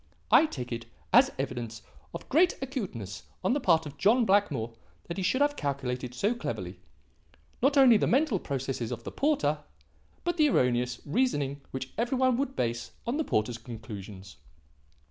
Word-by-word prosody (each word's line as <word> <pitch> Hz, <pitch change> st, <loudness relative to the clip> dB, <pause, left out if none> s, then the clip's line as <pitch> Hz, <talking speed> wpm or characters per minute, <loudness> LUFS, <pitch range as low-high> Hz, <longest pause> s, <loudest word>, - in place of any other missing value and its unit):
I 320 Hz, -, +7 dB
take 125 Hz, -, -6 dB
it 115 Hz, -1 st, -4 dB, 0.3 s
as 260 Hz, +3 st, +7 dB
evidence 120 Hz, -4 st, -4 dB, 0.3 s
of -, -, -8 dB
great 345 Hz, +5 st, +3 dB
acuteness 190 Hz, -, -5 dB, 0.2 s
on -, -, +2 dB
the 285 Hz, -, +1 dB
part 165 Hz, -, +3 dB
of 145 Hz, -, -9 dB
John 230 Hz, +5 st, +4 dB
Blackmore 150 Hz, -, +1 dB, 0.3 s
that 170 Hz, -, -6 dB
he -, -, -1 dB
should 260 Hz, +9 st, +1 dB
have 290 Hz, 0 st, +3 dB
calculated 130 Hz, -, -3 dB
so 205 Hz, -, +1 dB
cleverly, 235 Hz, -, -5 dB, 0.8 s
not 280 Hz, +2 st, +3 dB
only 255 Hz, -5 st, +8 dB
the -, -, +1 dB
mental 265 Hz, -, +2 dB
process 135 Hz, -3 st, -3 dB
of 120 Hz, -1 st, -5 dB
the -, -, -6 dB
porter, 270 Hz, -, +1 dB, 0.6 s
but 345 Hz, 0 st, -1 dB
the 305 Hz, -2 st, +5 dB
erroneous 125 Hz, -, +1 dB
reasoning 145 Hz, -, 0 dB
which 130 Hz, 0 st, -6 dB
every 245 Hz, +3 st, 0 dB
one 255 Hz, -1 st, +3 dB
would 270 Hz, 0 st, -2 dB
base 115 Hz, 0 st, -2 dB
on 240 Hz, +5 st, -1 dB
the 315 Hz, -, +1 dB
porter's 115 Hz, -, -1 dB
conclusions. 105 Hz, -4 st, -9 dB
150 Hz, 165 wpm, -29 LUFS, -, 0.8 s, only